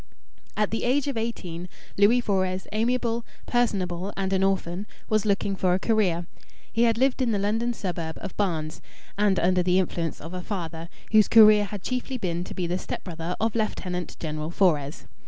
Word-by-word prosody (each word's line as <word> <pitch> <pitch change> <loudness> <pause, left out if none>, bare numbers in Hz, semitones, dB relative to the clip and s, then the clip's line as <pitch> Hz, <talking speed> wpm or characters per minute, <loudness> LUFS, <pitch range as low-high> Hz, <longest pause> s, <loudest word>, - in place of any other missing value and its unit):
At 210 -1 +1
the 225 - -2
age 270 +3 +2
of 280 - -2
eighteen, 180 -7 -4 0.3
Louis 215 +5 +5
Fores, 190 -4 0
amiable, 235 +1 0 0.2
personable, 195 -6 0
and 195 0 -1
an 190 0 +2
orphan, 195 0 -1 0.2
was 215 -1 +1
looking 200 -1 +1
for 185 -1 +2
a - - 0
career. 190 -6 +1 0.5
He 230 +1 +4
had 230 -1 +2
lived 265 +1 +2
in 245 -3 +2
the - - +1
London 220 +4 0
suburb 175 -7 -4
of 195 - -7
Barnes, 160 -6 -2 0.3
and 200 -2 +2
under 180 +1 +3
the 180 +1 +2
influence 170 -4 -1
of 165 +4 -8
a 180 - -4
father 170 -4 -5 0.2
whose 215 -1 +6
career 215 -2 +7
had 200 -2 -7
chiefly 255 +1 -2
been 175 -5 -2
to - - -8
be 180 - -1
the 175 +2 -1
stepbrother 170 -1 -5
of 225 0 +1
Lieutenant 180 -5 -3
General 155 -1 -4
Fores. 155 -6 +1
195 Hz, 180 wpm, -26 LUFS, 175-220 Hz, 0.5 s, career